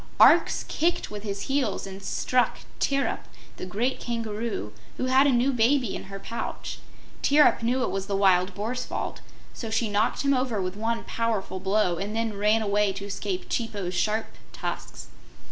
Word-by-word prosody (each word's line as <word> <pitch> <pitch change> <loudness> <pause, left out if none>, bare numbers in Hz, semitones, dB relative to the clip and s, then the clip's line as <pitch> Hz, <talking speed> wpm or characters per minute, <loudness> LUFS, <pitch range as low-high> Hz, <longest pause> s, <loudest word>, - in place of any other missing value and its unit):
Arx - - +6
kicked 335 -5 0
with 210 -1 -5
his 200 -1 -4
heels 265 -6 0
and 195 0 -8
struck 250 +5 +1 0.2
Tirrip, 275 0 +1 0.4
the - - -6
great 230 +8 -1
Kangaroo, 225 - -3 0.2
who - - -1
had 260 +2 +5
a - - +4
new 255 +2 +3
baby 245 -1 +2
in - - -6
her 195 0 -7
pouch. 230 +4 -5 0.4
Tirrip 295 -2 +5
knew 250 +3 +1
it - - -1
was 195 0 -3
the 200 - -1
Wild 185 -1 +3
Boar's 235 +5 -2
fault, - - -4 0.3
so 225 - -5
she 220 -1 0
knocked 205 +6 +1
him 280 0 +3
over 255 -5 0
with 185 0 -2
one 225 +2 -1
powerful 220 -5 -2
blow 190 -2 +1
and 205 +4 -3
then 225 -1 0
ran 210 +2 +3
away 205 -1 +2
to 195 +1 -6
escape 200 -2 -3
Chipo's 205 -6 -2
sharp 215 +5 +1 0.3
tusks. - - -5
215 Hz, 175 wpm, -26 LUFS, 195-245 Hz, 0.4 s, Arx